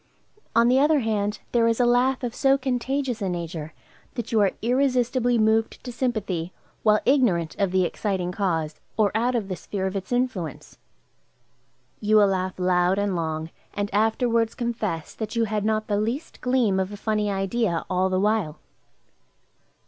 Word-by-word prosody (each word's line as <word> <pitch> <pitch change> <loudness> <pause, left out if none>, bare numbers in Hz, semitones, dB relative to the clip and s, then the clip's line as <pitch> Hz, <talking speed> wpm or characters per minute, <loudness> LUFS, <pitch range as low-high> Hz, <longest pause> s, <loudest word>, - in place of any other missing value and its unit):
On 230 0 +5
the 255 +2 +4
other 295 0 +4
hand, 210 -2 -1
there 230 -1 +3
is 230 +1 +1
a 245 - +4
laugh 250 +2 +2
of 240 -2 -2
so 270 +1 +3
contagious 260 -1 -2
a 195 - -1
nature, 165 -3 -5 0.4
that 240 -1 -4
you 225 - +3
are 195 -2 +3
irresistibly 245 -1 +2
moved 220 0 +1
to 250 - -6
sympathy 210 -9 -2 0.3
while 215 -1 +4
ignorant 215 - +2
of 200 -2 +2
the 185 0 +2
exciting 185 -1 -2
cause, 165 -6 -2 0.2
or 210 -3 +3
out 240 +3 +1
of 220 -5 -1
the 185 - -3
sphere 190 +1 -4
of 190 +1 -2
its 190 +2 -5
influence. 245 -9 -2 1.2
You 215 0 +2
will 205 -2 +6
laugh 185 -1 -2
loud 180 0 +2
and 200 -2 0
long, 160 -1 -3 0.2
and 205 0 -2
afterwards 225 +2 +1
confess 225 -9 -3
that 220 +1 -5
you 230 - +2
had 215 -2 -1
not 215 0 0
the 205 -1 0
least 240 +9 -4
gleam 245 -7 +2
of 190 +1 -1
a 205 - -7
funny 210 -1 0
idea, 195 -2 -1
all 185 0 +1
the 185 0 +1
while. 205 -6 0
215 Hz, 170 wpm, -24 LUFS, 185-240 Hz, 1.2 s, will